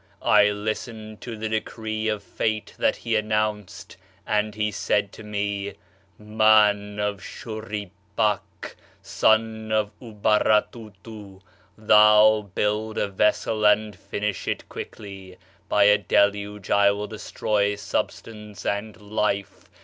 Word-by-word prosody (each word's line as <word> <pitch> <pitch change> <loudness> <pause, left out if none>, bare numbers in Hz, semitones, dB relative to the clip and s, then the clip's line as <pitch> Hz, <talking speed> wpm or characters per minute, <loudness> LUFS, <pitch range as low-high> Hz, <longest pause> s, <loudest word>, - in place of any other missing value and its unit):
I 105 - +5
listened 110 +1 -5
to 115 -3 -7
the 110 +1 -3
decree 110 0 -3
of 105 -2 -2
fate 110 -1 -3
that - - +2
he 115 -1 -2
announced, 105 -3 -2 0.3
and 105 0 0
he 105 0 -1
said 100 0 0
to - - -12
me: 100 -1 -3 0.2
" 95 - -35
Man 105 -1 +3
of 105 -2 -2
Shurippak, 105 -2 -4 0.3
son 110 +2 +1
of 105 -1 +1
Ubaratutu 105 -2 -1 0.4
thou, 105 -1 +5
build 105 +1 -1
a 100 - 0
vessel 105 +2 0
and 105 0 +3
finish 105 +1 -4
it - - -3
[quickly]. 95 -3 -9 0.3
[By - - +4
a 105 0 +5
deluge] 100 +1 0
I 100 0 +5
will 100 +1 -2
destroy 105 -1 -1
substance 105 +1 -5
and 105 +2 -3
life. 105 -1 -3
105 Hz, 120 wpm, -24 LUFS, 100-110 Hz, 0.4 s, I